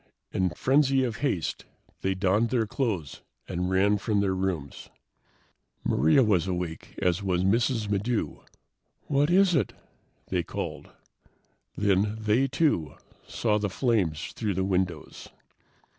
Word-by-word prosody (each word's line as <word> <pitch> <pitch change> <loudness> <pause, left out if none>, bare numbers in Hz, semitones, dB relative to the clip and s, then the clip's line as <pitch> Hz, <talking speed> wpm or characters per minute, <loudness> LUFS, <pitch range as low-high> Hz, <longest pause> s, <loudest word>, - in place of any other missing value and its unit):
In 95 -1 +1
frenzy 135 - +2
of 120 -4 -2
haste, 100 - -2 0.4
they 95 0 0
donned 100 +5 +2
their 115 -1 +1
clothes 110 - -3 0.3
and 90 0 -2
ran 100 +2 +3
from 105 +1 0
their 100 -2 +1
rooms. 95 -7 -3 0.9
Maria 80 - +4
was 95 -6 +2
awake 90 -3 -4
as 90 +1 +1
was 90 -2 0
Mrs. 115 +2 +1
Maddox. 105 +3 -2 0.5
"What 145 +2 +1
is 185 +1 +4
it?" - - +1 0.6
they 90 -2 +1
called. 85 - -6 0.9
Then 100 +1 +1
they, 110 +5 +2
too, 135 - 0 0.3
saw 105 -2 0
the 100 -1 -1
flames 95 - 0
through 105 -4 -2
the 95 - 0
windows. 95 -2 -2
100 Hz, 130 wpm, -27 LUFS, 90-120 Hz, 0.9 s, Maria